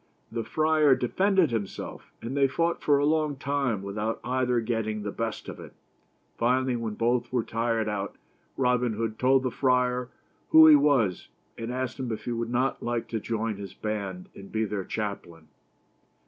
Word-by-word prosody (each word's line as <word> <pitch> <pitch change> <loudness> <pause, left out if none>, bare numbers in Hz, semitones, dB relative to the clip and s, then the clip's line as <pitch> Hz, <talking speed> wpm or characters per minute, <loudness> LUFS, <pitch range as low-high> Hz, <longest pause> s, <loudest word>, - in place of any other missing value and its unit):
The 115 0 -2
friar 155 -2 +3
defended 185 - +2
himself, 110 -4 -5
and 120 +4 -4
they 140 -1 +4
fought 170 +5 -1
for 145 -1 +4
a 145 - +2
long 155 -1 +1
time 135 -6 -1
without 105 +3 -3
either 125 -1 +1
getting 110 -2 -2
the 105 - -3
best 115 0 -4
of - - -7
it. - - -11 0.7
Finally, 125 +2 +2
when 115 -2 -4
both 120 +2 0
were 125 -3 +1
tired 115 -1 -1
out, 100 -2 -3 0.4
Robin 125 -2 +2
Hood 110 0 -3
told 130 +1 +4
the 130 - -1
friar 125 -1 +1 0.4
who 160 0 +9
he 155 -1 +9
was, 140 -10 +2 0.3
and 115 +1 -5
asked 130 +1 -3
him 125 -3 -3
if 110 - -5
he 120 - -2
would 115 0 -2
not 125 +2 0
like 120 -1 -2
to 115 - -2
join 110 -1 -2
his 100 -1 -8
band 100 -4 -4
and 100 0 -12
be 110 0 0
their 100 -2 -3
chaplain. 85 -7 -5
120 Hz, 175 wpm, -27 LUFS, 110-130 Hz, 0.7 s, who